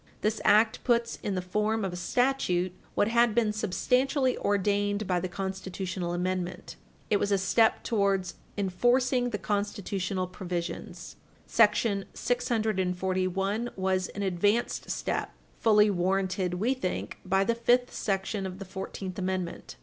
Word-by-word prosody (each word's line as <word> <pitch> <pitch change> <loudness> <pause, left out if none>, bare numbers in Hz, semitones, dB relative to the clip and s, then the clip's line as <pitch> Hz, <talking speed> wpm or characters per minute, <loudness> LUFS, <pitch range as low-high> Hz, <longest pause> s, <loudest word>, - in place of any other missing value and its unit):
This 215 +1 0
act 220 +1 +4
puts 235 -1 +1
in 200 - -2
the 185 - -2
form 210 +3 0
of 185 - -3
a - - -4
statute 185 -3 +1 0.2
what 205 - +3
had 235 -1 +3
been 220 -3 +2
substantially 255 - +1
ordained 205 +1 0
by 180 -2 +1
the 185 - -2
constitutional 190 -1 -4
amendment. 180 0 -3 0.4
It 205 - +5
was 200 - -1
a 200 - +4
step 220 +4 +3
towards 195 -4 +1 0.2
enforcing 245 +6 +2
the 215 - -2
constitutional 200 -2 -2
provisions. 180 -2 -5 0.3
Sect. 230 0 +4 0.3
641 195 -3 0
was 190 -1 0
an 200 - -2
advanced 205 +5 0
step, - - -2 0.3
fully 210 -2 +5
warranted, 185 0 0
we 225 +8 +1
think, 185 -9 -4
by 195 +1 +2
the 235 - +1
fifth 245 +2 +2
section 195 0 -2
of 185 0 -7
the 195 - -7
Fourteenth 190 0 -6
Amendment. 185 - -3
195 Hz, 135 wpm, -28 LUFS, 185-220 Hz, 0.4 s, It